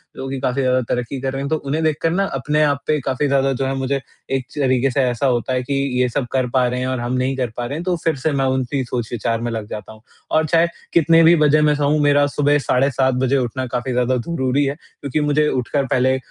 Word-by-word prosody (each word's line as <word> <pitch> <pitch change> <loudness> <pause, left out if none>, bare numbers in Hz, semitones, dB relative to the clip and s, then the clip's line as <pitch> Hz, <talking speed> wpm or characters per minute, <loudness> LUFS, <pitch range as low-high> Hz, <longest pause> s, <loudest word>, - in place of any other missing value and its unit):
जो 135 - -6
कि 135 0 -4
काफ़ी 130 +2 -1
ज़्यादा 130 0 +2
तरक्की 125 +2 -2
कर 135 0 -2
रहे 135 - -3
हैं। 140 - -3
तो 160 - +2
उन्हें 150 +2 -2
देखकर 155 +1 +1
ना, 190 +4 +1
अपने 150 -1 0
आप 145 -2 +1
पे 155 -1 +2
काफ़ी 135 +2 0
ज़्यादा 135 0 +2
जो 135 +1 -2
है, 135 - -1
मुझे 135 +1 -1 0.3
एक 135 -2 -1
तरीके 130 -2 +2
से 135 - +1
ऐसा 125 +1 0
होता 125 0 0
है 125 0 0
कि, 140 - -3 0.3
"ये 125 - +2
सब 125 +2 -2
कर 130 -1 +1
पा 125 0 +2
रहे 125 +1 -2
हैं 130 - -2
और 130 -1 -2
हम 120 +1 -3
नहीं 130 +1 0
कर 125 -2 -1
पा 120 - -2
रहे 140 +5 -4
हैं।" 165 - -5
तो 180 0 0
फिर 165 - +1
से 155 - +3
मैं 135 -1 0
उनकी 130 +1 -2
ही 135 - 0
सोच 120 -2 -4
विचार 115 -1 -1
में 120 0 -2
लग 110 -2 -4
जाता 105 -1 -7
हूँ। 110 - -17 0.3
और 160 0 +3
चाहे, 165 +2 +3 0.3
कितने 165 0 +5
भी 165 +1 +7
बजे 150 +1 +4
मैं 150 -1 +3
सोऊँ, 145 +1 +1
मेरा 145 0 +4
सुबह 145 0 +3
साढ़े 135 +2 +3
7 130 0 +1
बजे 135 +2 +2
उठना 130 0 -2
काफ़ी 125 +1 -2
ज़्यादा 125 +1 +1
ज़रूरी 130 0 0
है 140 +1 -2
क्योंकि 145 -2 -5
मुझे 150 +1 +2
उठकर 135 +2 -1
पहले 130 0 +2
135 Hz, 270 wpm, -20 LUFS, 125-145 Hz, 0.3 s, भी